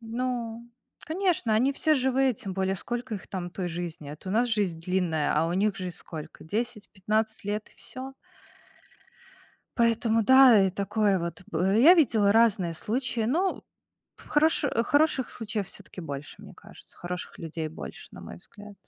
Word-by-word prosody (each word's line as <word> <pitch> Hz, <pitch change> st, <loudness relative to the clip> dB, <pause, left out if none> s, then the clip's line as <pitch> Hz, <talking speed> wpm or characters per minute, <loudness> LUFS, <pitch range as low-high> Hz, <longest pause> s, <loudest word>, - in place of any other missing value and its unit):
Ну, 235 Hz, 0 st, -4 dB, 0.3 s
конечно, 325 Hz, -, 0 dB
они 255 Hz, +6 st, +3 dB
все 310 Hz, +3 st, +2 dB
живые. 265 Hz, -1 st, +2 dB
Тем 195 Hz, -2 st, -5 dB
более, 190 Hz, 0 st, 0 dB
сколько 240 Hz, +3 st, -4 dB
их 195 Hz, -, -8 dB
там 180 Hz, -2 st, -5 dB
той 180 Hz, 0 st, -4 dB
жизни? 165 Hz, -3 st, -6 dB
А 150 Hz, -, -7 dB
то 185 Hz, -, -10 dB
у -, -, -2 dB
нас 240 Hz, +3 st, +2 dB
жизнь 200 Hz, -8 st, 0 dB
длинная, 170 Hz, -4 st, 0 dB
а 155 Hz, +2 st, +2 dB
у 170 Hz, -, -2 dB
них 200 Hz, +2 st, +1 dB
жизнь 185 Hz, -2 st, -5 dB
сколько? 160 Hz, -1 st, -9 dB
10-15 215 Hz, +1 st, -2 dB
лет 210 Hz, +1 st, -3 dB
и -, -, -24 dB
всё. 260 Hz, +1 st, -8 dB, 1.6 s
Поэтому, 230 Hz, -1 st, +2 dB
да, 255 Hz, -4 st, +7 dB
и -, -, 0 dB
такое 200 Hz, +1 st, +1 dB
вот, 170 Hz, +1 st, -5 dB
б 190 Hz, +4 st, +1 dB
я 305 Hz, +9 st, +9 dB
видела 225 Hz, -, +4 dB
разные 205 Hz, -6 st, +3 dB
случаи, 230 Hz, +5 st, -2 dB
но 355 Hz, +10 st, 0 dB, 0.5 s
в -, -, -16 dB
хороши 300 Hz, -1 st, +2 dB
хороших 290 Hz, -2 st, +2 dB
случаев 210 Hz, -3 st, -4 dB
всё-таки -, -, -10 dB
больше, 145 Hz, -3 st, -7 dB
мне -, -, -12 dB
кажется. -, -, -16 dB
Хороших 180 Hz, +1 st, -6 dB
людей 165 Hz, -1 st, -4 dB
больше, 160 Hz, -, -9 dB
на -, -, -11 dB
мой -, -, -9 dB
взгляд. 205 Hz, -1 st, -14 dB
215 Hz, 165 wpm, -27 LUFS, 180-245 Hz, 1.6 s, я